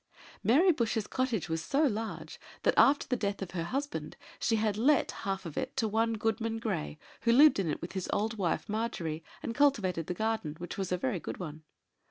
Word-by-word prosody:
Mary 320 - +5
Bush's 230 -7 0
cottage 240 -9 -1
was 160 0 -2
so 285 +3 +1
large, 225 -5 -2 0.2
that, - - +4
after 285 +1 +5
the 250 - +1
death 200 -4 -2
of 180 - -8
her 170 -3 -3
husband, 280 +8 -4 0.2
she 225 - +2
had 215 -2 +1
let 270 +6 +3
half 195 -1 -4
of 165 - -7
it - - -5
to 230 -4 +2
one 225 +2 +1
Goodman 225 +1 -1
Grey, 190 -10 -3 0.2
who 230 - +3
lived 285 0 +7
in 180 -4 0
it, 150 - -3
with 170 - -5
his 190 -2 -4
old 220 +2 0
wife 175 -4 0
Margery, 185 -8 -2 0.2
and 230 - -3
cultivated 210 - +2
the 180 - -2
garden, 220 -7 -1
which 175 +1 -6
was 190 -2 -3
a 180 - +2
very 205 -1 -1
good - - -6
one. 155 -3 -7
220 Hz, 210 wpm, -31 LUFS, 180-235 Hz, 0.2 s, lived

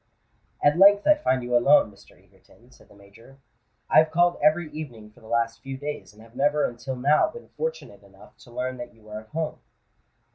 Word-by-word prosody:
"At 150 +4 +3
length 200 +1 +6
I 305 - +7
find 130 - -1
you 120 0 -1
alone, 120 -2 +4
Mr. 100 - -20
Egerton," 120 +2 -25
said - - -21
the - - -19
Major. 100 +7 -18 0.5
"I - - +6
have 160 0 +3
called 175 +2 +2
every 155 +1 +2
evening 120 -9 -9
for - - -22
the 110 - -17
last 115 0 -1
few 135 +1 -7
days, 145 -3 -6
and 105 +1 -17
have 115 +1 -19
never 145 +1 +2
until 120 +2 -5
now 145 +4 +3
been 475 - -13
fortunate 485 +1 -6
enough - - -19
to 120 - -17
learn 130 +1 -4
that 120 -1 -9
you 110 - -23
were 105 0 -8
at 110 - -16
home." 160 +4 -4
130 Hz, 210 wpm, -25 LUFS, 115-155 Hz, 0.5 s, I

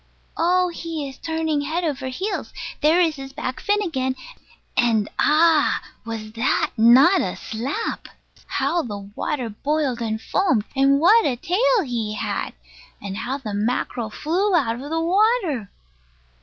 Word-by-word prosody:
Oh, 360 +2 +2
he 330 -4 -5
is 270 -1 -11
turning 320 -2 -1
head 320 +5 -2
over 280 -5 -2
heels! 380 +10 -3 0.3
There 315 +3 +4
is 325 -4 +2
his 270 0 -8
back 260 -3 -4
fin 415 0 +1
again. 260 -7 -1 0.6
And 230 -4 +2
Ah! 310 0 +4 0.2
was 225 -2 -6
that 230 +3 0
not 260 - +6
a 185 - -2
slap! 270 - -4 0.4
How 345 - 0
the 215 -8 -5
water 210 +6 -4
boiled 275 +1 -1
and 220 -1 -2
foamed; 265 - +1
and 275 +1 +4
what 420 +9 +6
a 260 - 0
tail 435 - +2
he 225 -4 -3
had! 205 -2 -3 0.5
And 195 -1 -6
how 255 +6 -3
the 225 -7 -6
mackerel 225 +2 -1
flew 360 - 0
out 240 -6 +1
of 285 - -7
the 325 +1 0
water! 355 - +1
280 Hz, 150 wpm, -22 LUFS, 235-335 Hz, 0.6 s, not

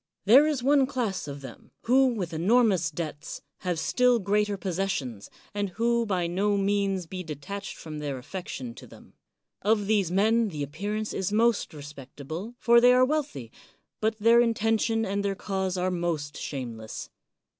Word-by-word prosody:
There 265 +9 +7
is 290 -5 -1
one 275 0 +4
class 225 - -2
of 140 0 -7
them, 135 - -11
who, 265 +3 +4
with 200 -9 -2
enormous 200 +3 +3
debts, 155 0 -6 0.2
have 180 -2 -2
still 250 +8 +3
greater 210 0 0
possessions, 175 - -3 0.2
and 205 -1 -1
who 235 +1 +2
can 230 - -2
by 185 -4 0
no 200 +4 +1
means 195 -2 0
be 185 +3 -6
detached 160 +6 -7
from 155 -2 -7
their 145 -3 -3
affection 130 -4 -6
to - - -12
them. - - -16 0.5
Of 210 0 +2
these 200 -4 +2
men 220 +5 +3
the 150 -7 -4
appearance 205 +9 -3
is 190 +1 -2
most 225 +1 +2
re 150 -2 -10
spectable, 145 - -8
for 235 0 +5
they 245 +1 +7
are 255 0 +5
wealthy, 265 - -3 0.5
but 220 0 0
their 230 +2 +5
inten 225 -1 +1
tion 225 -1 +1
and 200 +1 -1
their 200 -1 -1
cause 190 -1 -2
are 185 +1 0
most 165 -4 -2
shameless. 115 -6 -6
195 Hz, 170 wpm, -27 LUFS, 160-225 Hz, 0.5 s, There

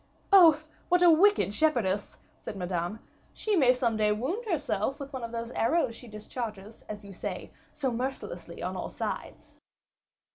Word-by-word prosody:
"Oh! 330 -6 +8 0.3
what 355 0 +4
a 345 - +8
wicked 355 - +4
shepherdess!" 210 -9 +1 0.2
said - - -7
Madame. 180 +2 -3 0.3
"She 430 -2 0
may 265 -8 +6
some 245 -3 0
day 210 -1 +3
wound 285 - -2
herself 275 - -1
with 280 0 -8
one 260 -2 -5
of 230 - -5
those 230 0 -4
arrows 255 0 +1
she 245 - -12
discharges, 215 -1 -7
as 210 -1 -7
you 200 - -10
say, - - -6 0.2
so 275 -4 -2
mercilessly 260 +3 -5
on - - -3
all - - -4
sides." - - -6
240 Hz, 160 wpm, -29 LUFS, 210-305 Hz, 0.3 s, Oh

